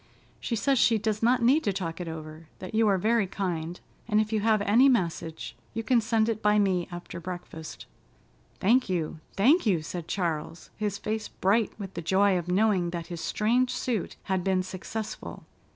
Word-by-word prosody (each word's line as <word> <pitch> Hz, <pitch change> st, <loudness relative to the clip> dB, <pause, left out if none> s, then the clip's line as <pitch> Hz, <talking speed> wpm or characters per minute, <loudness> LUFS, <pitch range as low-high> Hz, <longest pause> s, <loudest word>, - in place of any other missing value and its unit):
She 235 Hz, -, -2 dB
says 270 Hz, +3 st, +2 dB
she 230 Hz, -2 st, +4 dB
does 215 Hz, 0 st, -1 dB
not 240 Hz, +1 st, +3 dB
need 275 Hz, +7 st, +4 dB
to 205 Hz, -, +1 dB
talk 180 Hz, -3 st, -4 dB
it 175 Hz, -, -5 dB
over, 160 Hz, 0 st, -8 dB
that 185 Hz, -, -8 dB
you 220 Hz, 0 st, +3 dB
are 195 Hz, -2 st, +3 dB
very 220 Hz, +1 st, +2 dB
kind, 175 Hz, -3 st, -3 dB, 0.3 s
and 215 Hz, -2 st, +3 dB
if 215 Hz, +1 st, 0 dB
you 215 Hz, -, +2 dB
have 215 Hz, -1 st, +2 dB
any 235 Hz, +7 st, +5 dB
message, 170 Hz, -8 st, -1 dB, 0.2 s
you 225 Hz, -, -2 dB
can 235 Hz, +1 st, +3 dB
send 225 Hz, 0 st, +1 dB
it 220 Hz, -2 st, -1 dB
by 210 Hz, 0 st, +3 dB
me 190 Hz, -4 st, +2 dB
after 175 Hz, 0 st, -7 dB
breakfast." 170 Hz, -2 st, -8 dB, 0.7 s
"Thank 235 Hz, +4 st, +3 dB
you, 165 Hz, -3 st, -2 dB
thank 260 Hz, -, +4 dB
you!" 175 Hz, -6 st, +2 dB
said 170 Hz, +1 st, -6 dB
Charles, 165 Hz, -3 st, -3 dB
his 210 Hz, -2 st, -2 dB
face 215 Hz, +1 st, -3 dB
bright 205 Hz, +3 st, 0 dB
with 195 Hz, -2 st, -6 dB
the 170 Hz, -, -5 dB
joy 190 Hz, +3 st, +3 dB
of 175 Hz, -1 st, -2 dB
knowing 185 Hz, -1 st, +2 dB
that 170 Hz, -1 st, -4 dB
his 170 Hz, -, -5 dB
strange 245 Hz, +4 st, +1 dB
suit 245 Hz, -6 st, -2 dB
had 190 Hz, -2 st, -1 dB
been 185 Hz, -1 st, +1 dB
successful. 200 Hz, +4 st, -6 dB
200 Hz, 190 wpm, -27 LUFS, 175-220 Hz, 0.7 s, any